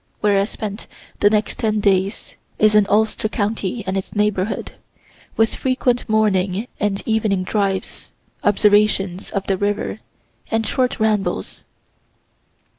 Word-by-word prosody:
(Where 205 -1 +3
I 195 - +2
spend 210 0 -6 0.3
the 205 - +5
next 210 0 0
ten 215 -1 +1
days 195 0 0 0.2
is 215 0 +4
in 210 -1 +5
Ulster 215 +1 +1
county 215 0 -2
and 190 0 -2
its 195 +2 -4
neighborhood, 210 -1 0 0.7
with 225 0 +3
frequent 255 -2 0
morning 205 -1 +1
and 205 -2 -1
evening 215 -4 +1
drives, 195 0 -2 0.3
observations 205 -2 +2
of 195 -1 -3
the 195 - 0
river, 200 - -2 0.5
and 225 0 0
short 255 0 0
rambles.) 215 -2 -1
210 Hz, 125 wpm, -20 LUFS, 195-220 Hz, 0.7 s, the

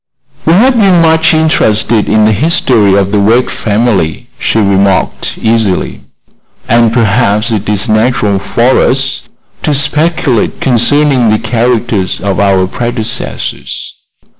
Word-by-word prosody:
"We 165 - +4
have 250 +8 +3
been 195 -5 +3
much 160 -1 +3
interested 115 -9 +1
in 110 0 +3
the 110 - +3
history 110 - +1
of 100 -1 0
the 105 - +1
Wegg 115 +5 +1
family," 105 -6 -1
she - - -1
remarked, 100 -2 0
easily; 110 -4 -1 0.7
"and 115 -1 +2
perhaps 110 -1 +1
it 105 -2 -2
is 105 +2 -2
natural 110 -2 0
for 120 +5 +1
us 130 +1 -1 0.4
to 150 - -1
speculate 150 -4 0
concerning 130 0 +2
the 110 - +2
characters 115 -4 -1
of 100 -1 -2
our 95 -2 +2
predecessors. 115 +2 -4
115 Hz, 125 wpm, -9 LUFS, 105-130 Hz, 0.7 s, We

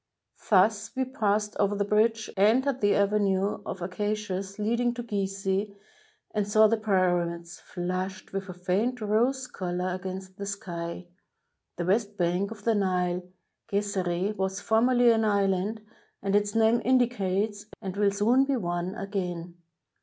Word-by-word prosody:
Thus 205 +1 +3
we 260 0 0
passed 210 -4 0
over 205 0 +2
the 205 0 0
bridge, 220 +1 +2
entered 245 +7 +3
the 205 -1 +3
ave 200 +1 +2
nue 195 0 0
of 185 - -5
acacias 195 0 -3
leading 235 +3 0
to 240 - -4
Gizeh, 195 -1 -2 0.6
and 210 -2 -1
saw 215 +1 +5
the 225 +1 +4
Pyramids, 175 -5 0
flushed 185 +2 -4
with 195 0 -4
a - - -5
faiat 195 +8 -1
rose 235 +5 +1
color, 180 -4 -3
against 185 0 -6
the 200 - -5
sky. 175 -4 -5 0.7
The 175 - -3
west 205 +2 0
bank 180 +3 +1
of 215 -2 -10
the 230 - +3
Nile, 180 -3 0 0.5
Gezeereh, 200 -1 -1
was 190 0 -1
formerly 240 +2 +4
an 225 -1 +2
island, 200 +1 0 0.4
as 195 - 0
its 205 +1 +2
name 225 +1 +4
indicates, 210 -5 +1
and 195 -3 -5
will 205 0 +3
soon 225 +7 +3
be 275 0 0
one 175 -1 -2
again. 180 -4 -4
200 Hz, 145 wpm, -27 LUFS, 185-220 Hz, 0.7 s, saw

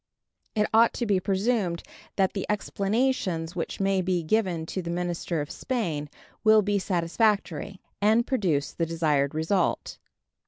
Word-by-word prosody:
It 210 -1 +2
ought 230 +1 +5
to 240 - -2
be 200 -4 +2
presumed 195 -2 0 0.3
that 190 -1 +2
the 195 - -3
explanations 200 -5 0
which 170 - -4
may 195 -1 +2
be 180 -2 0
given 180 -3 0
to 185 - -4
the 170 - -6
minister 175 -2 -2
of 145 - -6
Spain 165 - -2 0.3
will 215 -1 +6
be 205 0 +1
satisfactory, 190 0 0 0.2
and 220 +3 +4
produce 180 - 0
the 165 - -2
desired 150 -4 +1
result. 165 +3 0
190 Hz, 145 wpm, -26 LUFS, 165-210 Hz, 0.3 s, will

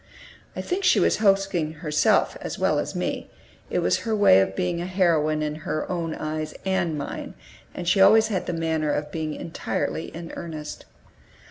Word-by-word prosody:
I - - -3
think 380 +2 -2
she 360 - +5
was - - +3
hoaxing 195 -6 +2
herself 150 -1 +2
as - - -5
well - - +2
as - - -4
me; - - -3 0.4
it - - 0
was - - +2
her 225 -2 -1
way 205 - +6
of 95 0 -1
being 175 -1 -1
a 175 - -3
heroine 160 -5 +2
in 150 0 -3
her 155 0 -3
own 165 -3 -2
eyes 155 0 -4
and 190 -5 0
mine, 145 - -6 0.4
and 175 - -5
she 185 +3 +3
had 195 - +9
always 220 0 +5
the 190 -4 -2
manner 160 -2 0
of 150 0 -2
being 155 -1 -3
entirely 165 0 -3
in 165 0 -8
earnest. 155 -3 -7
165 Hz, 180 wpm, -25 LUFS, 155-190 Hz, 0.4 s, had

